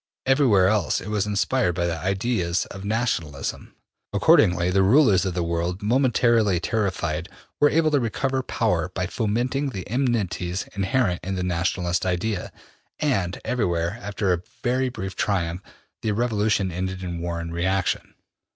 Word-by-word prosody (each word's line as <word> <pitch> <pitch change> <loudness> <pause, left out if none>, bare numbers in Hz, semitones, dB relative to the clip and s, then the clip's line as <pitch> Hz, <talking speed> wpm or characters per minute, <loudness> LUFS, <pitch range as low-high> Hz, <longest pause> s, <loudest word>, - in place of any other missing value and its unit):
Everywhere 130 -9 +4
else 105 -3 +1
it - - -8
was 105 -1 0
inspired 105 -1 +1
by 85 -1 0
the 85 -1 -1
ideas 95 -1 0
of 100 - -8
nationalism. 100 - -2 0.4
Accordingly, 90 0 +4
the 95 +1 +3
rulers 105 -2 +5
of 90 -2 -2
the 90 - 0
world, 85 +3 -2
momentarily 115 -4 +3
terrified, 90 -5 -1 0.3
were 145 - +5
able 155 0 +2
to 145 - +3
recover 130 +3 -1
power - - 0
by - - 0
fomenting 125 +6 -1
the 95 -7 -6
enmities 100 -8 -1
inherent 100 -1 +1
in 95 +2 -3
the 90 - -2
nationalist 90 0 0
idea, 95 +2 -2 0.5
and 100 -12 0
everywhere, 90 -4 -1
after 100 -3 0
a 85 - -2 0.2
very 130 +2 +1
brief 95 -5 -6
triumph, 90 -3 -1 0.4
the 110 - 0
revolution 105 -4 +1
ended 95 +2 -4
in 85 -2 -4
war 85 -1 -3
and 85 0 -5
reaction. 95 +2 -1
95 Hz, 150 wpm, -24 LUFS, 90-115 Hz, 0.5 s, rulers